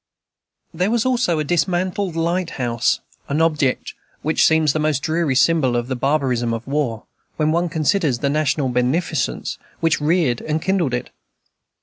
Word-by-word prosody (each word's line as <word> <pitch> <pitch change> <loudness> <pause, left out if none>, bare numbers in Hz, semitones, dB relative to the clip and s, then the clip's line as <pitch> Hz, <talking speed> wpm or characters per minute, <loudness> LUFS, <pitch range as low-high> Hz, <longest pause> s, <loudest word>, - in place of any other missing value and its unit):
There 180 +4 0
was 235 0 +1
also 245 -10 +1
a 155 - 0
dismantled 180 +3 0
lighthouse, 165 -9 0 0.3
an 145 +2 0
object 150 -5 +1 0.3
which 155 +2 -1
always - - +6
seems 160 -2 +3
the 155 - -1
most 150 -3 0
dreary 160 -4 0
symbol 135 -3 +3
of 120 +1 -2
the 130 - -1
barbarism 125 -4 0
of 115 - -7
war, 135 -6 -2 0.3
when 155 0 +2
one 170 +2 +1
considers 155 -3 +1
the 140 - -1
national 145 -1 +1
beneficence 130 +5 -1 0.2
which 165 -2 +1
reared 150 -6 +1
and 155 0 -1
kindled 170 -8 0
it. 120 - -5
155 Hz, 155 wpm, -20 LUFS, 130-170 Hz, 0.3 s, always